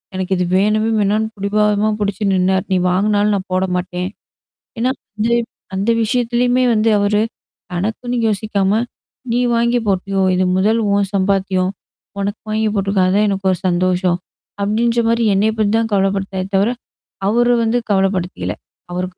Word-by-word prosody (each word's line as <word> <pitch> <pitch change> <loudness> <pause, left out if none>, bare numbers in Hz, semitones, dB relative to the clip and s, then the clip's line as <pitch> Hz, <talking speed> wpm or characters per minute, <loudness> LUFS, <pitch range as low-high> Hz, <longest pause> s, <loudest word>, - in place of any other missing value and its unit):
எனக்கு 190 0 -1
இது 180 - 0
வேணவே 215 +3 +2
வேணான்னு 210 +2 +1
புடிவாதமா 210 +1 +1
புடிச்சு 205 0 -2
நின்னாரு. 190 0 +1
நீ - - +3
வாங்குனாலும் 205 +3 +2
நான் 190 0 -4
போட 185 +1 +2
மாட்டேன். 180 +1 -3 0.7
ஏன்னா 250 +2 +2 0.3
அந்த 220 +2 0 0.5
அந்த 200 +4 +1
விஷயத்தலயுமே 245 +2 +1
வந்து 220 +1 +2
அவரு, 205 +1 +2 0.5
தனக்குன்னு 220 +7 -2
யோசிக்காம, 210 0 0 0.5
நீ 240 - +2 0.2
வாங்கி 235 +1 +2
போட்டியோ! 195 0 0
இது 185 0 +2
முதல் 215 +4 +2
உன் 200 -1 +2
சம்பாத்தியம். 190 -1 +1 0.5
உனக்கு 205 +2 -3
வாங்கி 220 0 +1
போட்டுக்க. 195 0 0
அதான் 205 +3 +3
எனக்கு 195 -1 0
ஒரு 180 - -2
சந்தோஷம். 180 0 +1 0.4
அப்பிடின்றமாரி 230 +2 +1
என்ன 215 +3 +2
பத்தி 210 -1 +2
தான் 225 -1 -1
கவலப்பட்டாரே 195 -1 0
தவிர. 200 +4 +3 0.6
அவரு 240 +2 +3
வந்து 225 +2 +1
கவலப்படுத்திக்கல. 190 -2 0 0.4
அவருக்கு 180 0 -4
200 Hz, 140 wpm, -18 LUFS, 190-220 Hz, 0.7 s, நீ